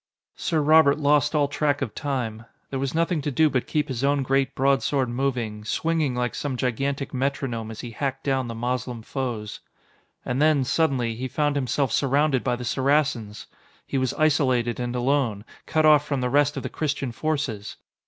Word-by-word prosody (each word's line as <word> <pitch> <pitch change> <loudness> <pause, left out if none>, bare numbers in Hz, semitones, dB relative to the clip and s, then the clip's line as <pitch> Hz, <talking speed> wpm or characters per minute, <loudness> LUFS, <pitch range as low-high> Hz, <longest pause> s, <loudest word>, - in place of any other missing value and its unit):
Sir 160 -3 0
Robert 155 -1 +5
lost 150 0 +2
all 145 -1 +3
track 145 0 0
of 115 - -5
time. 120 -6 -3 0.3
There 135 - -2
was 135 +2 -2
nothing 165 -1 +1
to 145 - -2
do 155 +2 +3
but 130 -2 -1
keep 150 -1 0
his 130 -1 -4
own 140 0 +2
great 135 0 +1
broadsword 135 -1 +1
moving, 120 -4 -2
swinging 155 +3 0
like 125 0 -1
some 140 -3 -3
gigantic 135 +3 -2
metronome 130 -4 -2
as 110 - -7
he 120 - -7
hacked 135 +3 -3
down 135 -3 0
the 115 - -5
Moslem 120 0 -3
foes. 115 -5 -4 0.7
And 125 +3 -1
then, 155 -3 +4
suddenly, 130 -5 +1
he 125 +3 -4
found 145 +2 0
himself 135 -1 0
surrounded 140 0 +2
by 125 - +1
the 125 0 -6
Saracens! 130 -5 0 0.4
He 135 - -1
was 130 -1 -1
isolated 130 -6 +2
and 120 0 -3
alone, 125 -5 0 0.2
cut 155 0 +2
off 150 -1 +6
from 145 -2 -2
the 125 -1 -1
rest 145 +1 +3
of - - -4
the - - -3
Christian 140 -4 -2
forces! 135 -7 -3
135 Hz, 185 wpm, -24 LUFS, 125-145 Hz, 0.7 s, off